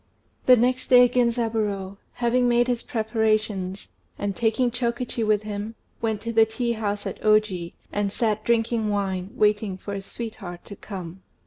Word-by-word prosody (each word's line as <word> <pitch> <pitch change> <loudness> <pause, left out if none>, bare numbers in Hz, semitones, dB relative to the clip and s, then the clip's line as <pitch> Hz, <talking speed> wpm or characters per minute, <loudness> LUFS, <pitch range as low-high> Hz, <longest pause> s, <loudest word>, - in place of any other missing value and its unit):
The 250 -1 +8
next 250 +2 +1
day 250 -1 +8
Genzaburô, 225 -5 0 0.2
having 245 +1 +2
made 240 0 +3
his 245 -1 0
preparations, 215 -4 -1 0.3
and 200 -1 -2
taking 240 +2 +1
Chokichi 240 -1 -2
with 215 -1 +2
him, 210 +1 -5 0.3
went 220 -2 -1
to 230 +1 -4
the 225 0 +5
tea 235 +2 -2
house 210 -2 -2
at - - -5
Oji, 215 -5 +2 0.2
and 205 -1 -1
sat 215 -1 0
drinking 225 -1 +1
wine, 195 -2 -1
waiting 210 -2 +1
for 200 +2 -7
his 195 -1 -6
sweetheart 210 -7 -7
to 200 - -9
come. 185 -3 -8
220 Hz, 155 wpm, -25 LUFS, 200-235 Hz, 0.3 s, The